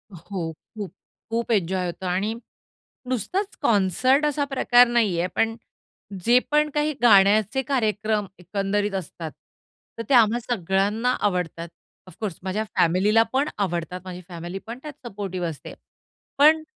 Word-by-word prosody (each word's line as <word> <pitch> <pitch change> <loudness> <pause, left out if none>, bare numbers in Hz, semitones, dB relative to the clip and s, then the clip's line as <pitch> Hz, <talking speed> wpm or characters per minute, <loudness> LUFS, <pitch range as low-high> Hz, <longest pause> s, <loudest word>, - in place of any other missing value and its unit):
हो, 170 -1 -5 0.3
खूप 205 -3 -5 0.4
खूप 230 +1 -2
एन्जॉय 185 -2 +1
होतो 175 +2 -5
आणि 190 +5 0 0.8
नुसताच 375 - -2
कॉन्सर्ट 255 - +3
असा 290 -1 0
प्रकार 245 -3 +4
नाहीये, 205 -8 +1
पण 225 0 +1 0.7
जे 245 +2 +6
पण 300 0 +3
काही 300 +1 +1
गाण्याचे 215 +3 +5
कार्यक्रम 220 -5 0
एकंदरीत 200 +2 -1
असतात 165 -3 -5 0.7
तर 230 - -3
ते - - +3
आम्हा 235 -1 +5
सगळ्यांना 210 +1 0
आवडतात. 180 -4 -1 0.4
ऑफकोर्स 185 0 -5
माझ्या 190 +3 -1
फॅमिलीला 200 +7 +4
पण 275 +3 +2
आवडतात. 180 -2 -2
माझी 180 -1 -7
फॅमिलीपण 190 +8 -7
त्यात 295 -4 -9
सपोर्टिव्ह 190 -5 -4
असते. 155 - -9 0.6
पण 310 +2 +6
210 Hz, 125 wpm, -24 LUFS, 185-245 Hz, 0.8 s, जे